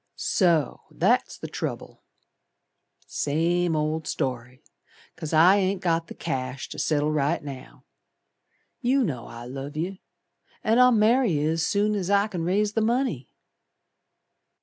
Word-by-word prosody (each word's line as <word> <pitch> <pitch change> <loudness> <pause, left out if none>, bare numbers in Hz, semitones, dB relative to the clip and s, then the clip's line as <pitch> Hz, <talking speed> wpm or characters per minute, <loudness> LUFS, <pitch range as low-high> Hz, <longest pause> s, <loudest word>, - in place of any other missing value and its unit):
"So 170 - +1
that's - - +1
the - - -7
trouble. - - -6 1.0
Same 165 +3 0
old 155 +1 -1
story. 125 -2 -4 0.5
'Cause 155 - -6
I 170 +5 +6
ain't 195 -1 0
got 165 -2 0
the - - -10
cash 130 +1 -4
to - - -7
settle 150 -1 +1
right 150 +2 0
now. 135 -3 -10 0.9
You 265 +1 +2
know 130 - -3
I 115 0 -9
love 135 +4 -7
yer, 185 +4 -3 0.6
An' 225 +3 +3
I'll 250 0 +7
marry 230 -1 +3
yer 150 +1 +1
as 165 0 -1
soon 205 +1 +1
As 195 -3 -2
I 200 +1 +3
c'n 185 -6 -5
raise 205 +4 +1
the 225 - +1
money." 230 - 0
165 Hz, 140 wpm, -25 LUFS, 145-205 Hz, 1.0 s, I'll